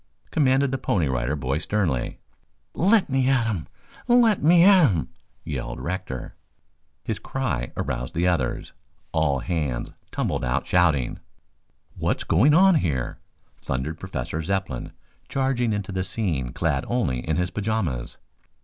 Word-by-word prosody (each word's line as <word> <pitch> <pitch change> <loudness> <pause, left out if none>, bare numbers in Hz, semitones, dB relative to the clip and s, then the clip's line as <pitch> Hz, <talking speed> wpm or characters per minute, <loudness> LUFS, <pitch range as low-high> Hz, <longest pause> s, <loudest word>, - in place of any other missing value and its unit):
commanded 135 -2 +3
the 135 - -1
Pony 90 - +1
Rider 65 +2 -1
Boy 70 0 -1
sternly. 85 -8 -1 0.6
"Let 200 +4 +3
me 135 -1 +1
at 125 -4 +3
him, 100 -10 -2 0.4
let 240 -4 +4
me 170 +3 +6
at 185 -7 +7
him!" 85 -6 -1 0.4
yelled - - -4
Rector. 85 -8 -5 0.7
His - - -3
cry 115 - -3
aroused 60 +1 -3
the 85 +2 +2
others. 80 -9 -1 0.4
All 75 -5 +1
hands 75 -8 -2 0.2
tumbled - - -2
out 60 +2 0
shouting. 80 -8 +2 0.8
"What's - - 0
going 130 - +4
on 190 +2 +7
here?" 65 - -2 0.4
thundered 70 +5 -3
Professor 80 -4 -4
Zepplin, 95 -6 -3 0.4
charging 130 -4 0
into 105 -2 -3
the 95 -1 -1
scene 85 - -2
clad 70 -3 0
only 115 - 0
in 80 +5 -2
his 90 +2 -1
pajamas. 100 - -2
90 Hz, 135 wpm, -24 LUFS, -, 0.8 s, at